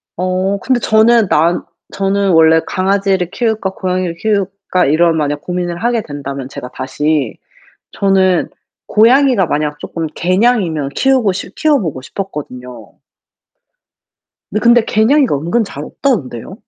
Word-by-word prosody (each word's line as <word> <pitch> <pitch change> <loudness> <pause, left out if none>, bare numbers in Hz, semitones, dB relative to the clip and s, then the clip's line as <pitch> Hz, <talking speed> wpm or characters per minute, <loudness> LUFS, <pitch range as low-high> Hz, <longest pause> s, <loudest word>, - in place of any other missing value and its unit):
어 185 +2 -1
근데 255 +2 0
저는 220 0 +4
난 165 +3 +2 0.3
저는 195 0 0
원래 160 0 +5
강아지를 190 -1 0
키울까, 220 -5 -1
고양이를 185 -2 -2
키울까 195 -3 -1
이런 165 +2 +3
만약 145 -1 -1
고민을 175 -1 -3
하게 235 -1 +1
된다면 140 -4 -6
제가 125 - -8
다시 140 0 -2 0.6
저는 190 -3 +2 0.4
고양이가 240 -2 +4
만약 150 -1 -2
조금 165 -1 -4
개냥이면 185 - +1
키우고 255 - +2
싶 185 - -7
키워보고 275 - 0
싶었거든요. 125 - -8 1.6
네. 215 - -1
근데 235 0 +5
개냥이가 245 - +2
은근 170 +11 0
잘 150 -8 -7
없다던데요. 185 - -3
185 Hz, 295 characters per minute, -15 LUFS, 155-220 Hz, 1.6 s, 원래